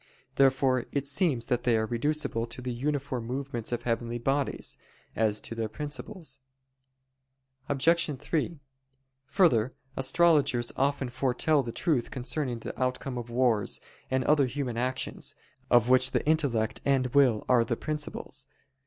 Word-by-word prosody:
Therefore 130 -2 +3
it 140 -1 -1
seems 140 -5 +1
that 120 0 0
they 120 -2 +2
are 110 - +1
reducible 120 0 -1
to 115 - -9
the 125 -1 -4
uniform 135 -1 -2
movements 130 -3 -3
of 120 -1 -2
heavenly 120 0 -1
bodies, 135 +3 -1 0.4
as 110 -1 +1
to - - -4
their 115 -1 -3
principles. 150 - -6 1.3
Obj. 165 +5 +3
3: 155 +3 -2 0.7
Further, 130 - +3 0.2
astrologers 140 -4 +3
often 135 -1 0
foretell 130 +4 +2
the 120 -3 -5
truth 140 -1 0
concerning 130 0 -2
the 115 - -7
outcome 130 0 -1
of 120 0 -7
wars, 120 -4 +2 0.3
and 130 0 +1
other 145 -2 +4
human 125 -2 -3
actions, 130 +2 -2 0.3
of 120 -1 +5
which 130 0 +6
the - - -1
intellect 140 -9 +1
and 135 -2 +2
will 130 -6 +4
are 125 -2 +5
the 115 -1 -2
principles. 150 -1 -4
130 Hz, 140 wpm, -28 LUFS, 120-145 Hz, 1.3 s, which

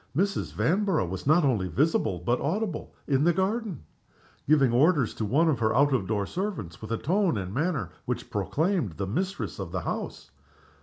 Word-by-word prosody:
Mrs. 195 +3 0
Vanborough 190 - +1
was 95 +8 -5
not 155 +3 +5
only 110 -9 +1
visible 95 - +1
but 120 +6 0
audible 185 +3 -2 0.2
in 135 -1 +2
the 175 +2 +4
garden; 190 - -1 0.6
giving 140 -4 +4
her 120 - +2
orders 145 -4 +3
to 110 - -3
one 145 +11 +3
of 145 -7 +2
the 110 -1 +1
out 145 0 +4
of 105 -8 0
door 105 -2 0
servants 175 - -4
with 110 - -7
the 115 - 0
tone 180 - +1
and 95 -1 -4
manner 140 - -1
which - - -4
proclaimed 160 - 0
the 100 +5 -3
mistress 185 - -3
of - - -5
the - - -2
house. - - -5
145 Hz, 190 wpm, -27 LUFS, 110-180 Hz, 0.6 s, not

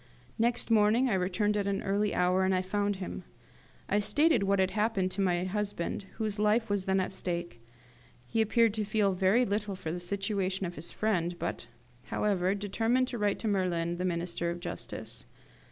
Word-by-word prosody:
Next 235 +1 +1
morning 225 +4 +4
I - - +2
returned 190 +3 +1
at 200 -1 0
an 200 -1 -1
early 200 +1 +1
hour, 180 +1 +3
and 185 -1 +1
found 205 +1 0
him. 190 -1 -6 0.6
I 205 - +2
stated 295 +9 +3
what 200 0 +2
had 190 0 +2
happened 210 -3 0
to 200 - 0
my 180 -2 +1
husband, 200 -1 -3
whose 215 -2 -3
life 215 +1 +2
was 200 -2 0
then 190 0 +2
at 185 - -1
stake. 175 -9 -4 0.6
He 225 - 0
appeared 225 0 +3
to 215 -1 -1
feel 205 -2 +1
very 190 +7 +3
little 205 -1 -2
for 185 -4 -5
the 175 - -3
situation 195 +1 -1
of 175 - -4
his 170 +1 -5
friend, 175 -5 0
but, 170 -7 -4 0.4
however, 195 -2 +1
determined 225 +5 +1
to 240 - -4
write 205 -1 +1
to 225 - -2
Merlin, 175 -4 0
the 180 - -3
Minister 170 -1 -1
of 170 +1 -4
Justice. - - -7
195 Hz, 185 wpm, -30 LUFS, 180-210 Hz, 0.6 s, morning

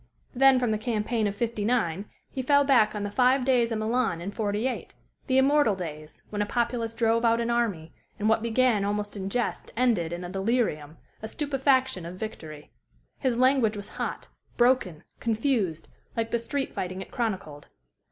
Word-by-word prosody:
Then 270 +1 +6
from 245 -3 +1
the 215 - 0
campaign 220 -1 -1
of 200 - -3
'59 215 -5 -1 0.3
he 265 - -3
fell 285 +2 +4
back 240 -7 +4
on 210 - -3
the 205 - -3
Five 255 +3 +3
Days 245 -3 +3
of 225 - 0
Milan 220 -4 0
in 180 +4 -5
'48 215 +4 -2 0.3
the 260 - +2
immortal 270 -5 +4
days, 155 -4 -8
when 210 -1 -2
a - - +1
populace 235 0 -1
drove 230 0 +2
out 230 0 +3
an 235 0 0
army, 205 -10 -1 0.2
and 210 - -1
what 220 0 +3
began 235 -2 +2
almost 205 +1 -2
in 195 -1 -4
jest 240 +3 -2
ended 225 -10 +2
in 175 +1 -5
a 175 - -6
delirium, 190 - -1 0.2
a 220 - -5
stupefaction 265 - +1
of 175 - -7
victory. 160 -8 -8 0.5
His 255 -4 0
language 255 -4 +3
was 205 - -8
hot, - - -5 0.3
broken, 240 -10 +2 0.2
confused, 225 - 0 0.3
like 225 0 -1
the 235 - +1
street 270 +4 -3
fighting 185 +1 -4
it - - -18
chronicled. 185 -11 -3
225 Hz, 175 wpm, -27 LUFS, 200-250 Hz, 0.5 s, Then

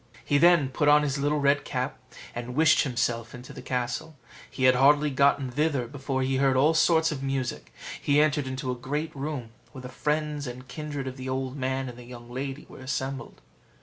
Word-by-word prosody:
He 145 - +3
then 170 -4 +5
put 145 +2 0
on 150 0 +6
his 140 -1 -1
little 145 +1 +1
red 140 0 +3
cap, - - -3 0.3
and 120 +1 -6
wished 160 +1 +5
himself 120 -3 -1
in 125 - -10
the - - -10
castle. 125 +6 -3 0.3
He 130 - -5
had 130 0 +7
hardly 145 +3 +4
got 140 +2 +4
thither 145 -3 +1
before 135 +1 -3
he 130 0 0
heard 135 -1 +3
all 150 +5 +4
sorts 160 0 +3
of 140 -3 -4
music; 135 -2 -3 0.3
he 145 0 +3
entered 150 -2 +2
into 130 0 -3
a - - -2
great 145 +6 -4
room, 135 -5 -4 0.2
where 130 -2 -9
the 125 - -7
friends 150 +1 -2
and 125 +1 -8
kindred 145 -1 -5
of 130 0 -6
the 130 0 -6
old 130 0 -2
man 130 -1 -2
and 125 -1 -9
the - - -10
young 120 0 -11
lady 135 +2 -5
were - - -13
assembled. 130 - -4
135 Hz, 205 wpm, -27 LUFS, 130-150 Hz, 0.3 s, had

